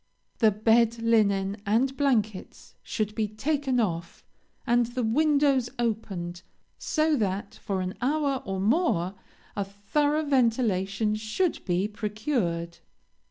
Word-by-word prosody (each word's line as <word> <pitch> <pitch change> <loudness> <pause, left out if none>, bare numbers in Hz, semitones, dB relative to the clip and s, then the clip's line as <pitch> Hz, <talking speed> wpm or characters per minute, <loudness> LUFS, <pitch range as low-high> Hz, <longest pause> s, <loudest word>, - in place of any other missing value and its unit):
The 220 - +6
bed 225 +2 +3
linen 200 -3 +2
and 240 +7 +1
blankets 220 -9 -1
should 215 -2 -3
be 215 -1 -1
taken 265 +4 -1
off, 170 -6 -2 0.4
and 240 0 +3
the 245 +1 -3
windows 280 0 +2
opened, 195 -7 -3 0.4
so 310 -1 +1
that, 200 0 -2
for 195 -2 -2
an 185 0 -3
hour 280 0 0
or 190 -1 -3
more, 200 - +1 0.4
a 200 - 0
thorough 290 +11 0
ventilation 220 -6 +1
should 220 - -1
be 185 +2 +1
procured. 210 - -2
220 Hz, 115 wpm, -27 LUFS, 200-265 Hz, 0.4 s, The